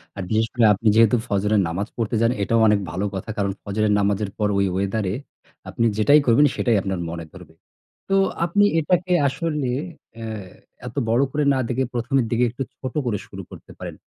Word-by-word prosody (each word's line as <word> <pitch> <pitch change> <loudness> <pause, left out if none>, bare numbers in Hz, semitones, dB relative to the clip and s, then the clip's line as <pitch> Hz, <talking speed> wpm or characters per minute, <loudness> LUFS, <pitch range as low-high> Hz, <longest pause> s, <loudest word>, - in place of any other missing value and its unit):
আর 100 - -5
বিশেষ 110 +1 +1
করে 120 -3 +3
আপনি 105 +3 -2
যেহেতু 115 +1 +5
ফজরের 105 0 +1
নামাজ 90 +5 -3
পড়তে 115 -1 -1
যান, 115 - +3
এটাও 115 +3 +2
অনেক 105 -1 +4
ভালো 95 +5 -2
কথা। 95 +3 -6
কারণ 100 -1 0
ফজরের 105 +1 0
নামাজের 100 0 0
পর 105 - +1
ওই 100 - +2
ওয়েদারে 95 +1 -1 0.6
আপনি 115 - 0
যেটাই 145 +8 +5
করবেন, 120 +5 +5
সেটাই 120 -3 +1
আপনার 95 -2 -3
মনে 85 0 -6
ধরবে। 90 -4 -14 0.6
তো 195 - +2 0.3
আপনি 205 +4 +2 0.2
এটাকে 180 +3 +1
আসলে 145 0 -2 0.5
অ্যা 115 -1 -7 0.6
এত 120 - -9
বড় 115 +3 +3
করে 150 +2 0
না - - 0
দেখে, 130 +2 0
১ম 120 +2 -4
এর - - -2
দিকে 120 +1 +2
একটু 125 +4 -4
ছোট 130 -2 -6
করে 115 -4 0
শুরু - - -9
করতে - - -12
পারেন। - - -7
110 Hz, 190 wpm, -22 LUFS, 100-125 Hz, 0.6 s, যেহেতু